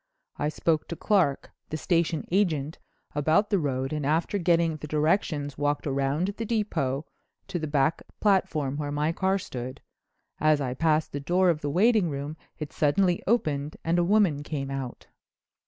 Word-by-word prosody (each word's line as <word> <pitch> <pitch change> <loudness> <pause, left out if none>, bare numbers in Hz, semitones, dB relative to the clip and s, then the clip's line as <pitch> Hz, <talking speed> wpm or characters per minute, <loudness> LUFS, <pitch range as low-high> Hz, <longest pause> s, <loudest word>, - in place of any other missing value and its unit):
I 150 - 0
spoke 155 0 0
to 170 - -4
Clark, 175 -8 +1 0.2
the 155 - -3
station 165 -1 0
agent, 160 -6 +1 0.3
about 160 +9 +2
the 200 - +3
road, 135 -2 -1
and, 150 -1 -2
after 160 +7 +1
getting 170 -2 +2
the 150 - -7
directions, 150 -2 0
walked 145 0 0
round 140 +5 0
the 230 - -2
depot 165 - -1 0.4
to 175 - -2
the 155 - -3
back 145 +1 +1 0.2
platform, 155 -9 +1
where 145 -1 -3
my 150 +2 0
car 190 +3 +1
stood. 130 -8 -6 0.6
As 155 -1 +4
I 130 -3 -2
passed 155 +2 +1
the 145 - -3
door 175 +5 +3
of 155 -2 -4
the 145 - -2
waiting 200 +3 +3
room 145 +1 -4 0.2
it 150 -1 -6
suddenly 175 +4 +2
opened 150 -10 0
and 170 +2 +2
a - - +3
woman 185 -6 +3
came 140 -2 -4
out." 135 -3 -5
155 Hz, 170 wpm, -27 LUFS, 145-175 Hz, 0.6 s, As